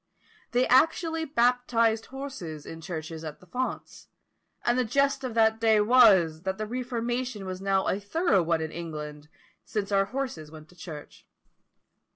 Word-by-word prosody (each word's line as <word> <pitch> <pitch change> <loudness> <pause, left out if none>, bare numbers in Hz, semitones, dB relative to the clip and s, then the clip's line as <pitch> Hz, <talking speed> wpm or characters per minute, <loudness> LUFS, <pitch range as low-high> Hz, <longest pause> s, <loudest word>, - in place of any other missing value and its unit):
They 245 +1 +2
actually 325 +4 +3
baptized 235 -4 +2
horses 260 - -7
in 165 0 -9
churches 160 -2 -6
at 155 -2 -7
the - - -18
fonts; 250 +8 -5 0.6
and 240 - +3
the 255 - +2
jest 275 +3 +1
of 250 -3 -4
that 220 -1 +3
day 220 -1 +4
was, 210 -9 +5
that 190 +1 -3
the 215 - -3
Reformation 240 -2 -3
was 185 0 -5
now 195 -1 +1
a 195 - 0
thorough 205 - +1
one 165 -1 0
in 160 - -4
England, 150 -3 -7 0.3
since 205 -2 -3
our 195 0 +3
horses 230 - -4
went 155 -1 -13
to 180 - -19
church. 165 -4 -10
210 Hz, 160 wpm, -27 LUFS, 165-250 Hz, 0.6 s, was